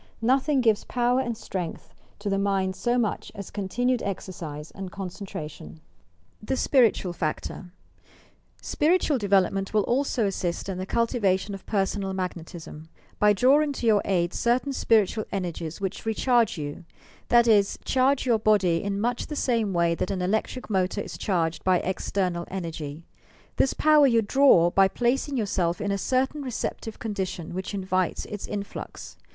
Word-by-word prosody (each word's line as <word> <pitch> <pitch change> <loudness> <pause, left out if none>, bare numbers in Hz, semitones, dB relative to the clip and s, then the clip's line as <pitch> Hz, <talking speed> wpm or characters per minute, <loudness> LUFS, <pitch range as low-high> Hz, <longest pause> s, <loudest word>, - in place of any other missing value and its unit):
Nothing 265 +3 +3
gives 220 -3 +2
power 245 +1 +1
and 240 -4 -2
strength 180 -6 -6 0.2
to 205 - -7
the 195 -1 +1
mind 195 -1 0
so 240 +6 0
much 225 -4 -1
as 200 -2 -8
continued 240 +6 0
exercbe 165 -6 -6
and 190 -2 -7
concentration. 185 -5 -7
PERSONAL - - -32 0.6
MAGNETISM 210 - -13
THE 265 - 0
SPIRITUAL 230 -10 +3
FACTOR 175 +2 -4 0.9
SpiritaaL 310 -3 +2
development 195 0 +1
will 210 - +4
also 250 -1 +1
assist 180 -3 -2
in 190 -2 -4
the 185 - -4
cultiva 230 -5 +2
tion 200 +2 -7
of 195 - -9
personal 195 -1 -1
magnetism, 170 -3 -6 0.3
by 210 0 +5
drawing 280 +8 +4
to 250 - -5
your 215 -3 +4
aid 175 -2 0
cer 240 +1 +2
tain 275 +2 -5
spiritual 220 -3 +2
energies 175 -3 -4
which 195 0 -4
recharge 230 -1 +2
you; 145 0 -6 0.2
— - - -27
that 235 0 +5
is, 205 -3 +4
charge 265 +1 +2
your 235 -3 +3
body 200 -6 +3
in 200 0 -2
much 240 +3 -1
the 300 - -5
same 230 -7 +1
way 170 -2 +2
that 170 - -2
an 185 -2 -2
electric 220 +6 -1
motor 190 0 0
is - - -7
charged 170 -4 -1
by 185 -1 +4
external 180 -1 -2
energy. 165 -4 -5 0.5
This 270 - +2
power 305 -2 +5
you 230 -3 +3
draw 205 -8 +5
by 195 +1 +5
placing 255 +6 0
yourself 180 -6 0
in 205 - -1
a 200 - -1
certain 265 +6 0
receptive 235 -3 -4
condi 205 -4 -3
tion 175 -2 -7
which 190 +3 -4
invites 185 -2 -1
its 210 -1 -6
influx. 200 -1 -7
200 Hz, 165 wpm, -26 LUFS, 185-240 Hz, 0.9 s, by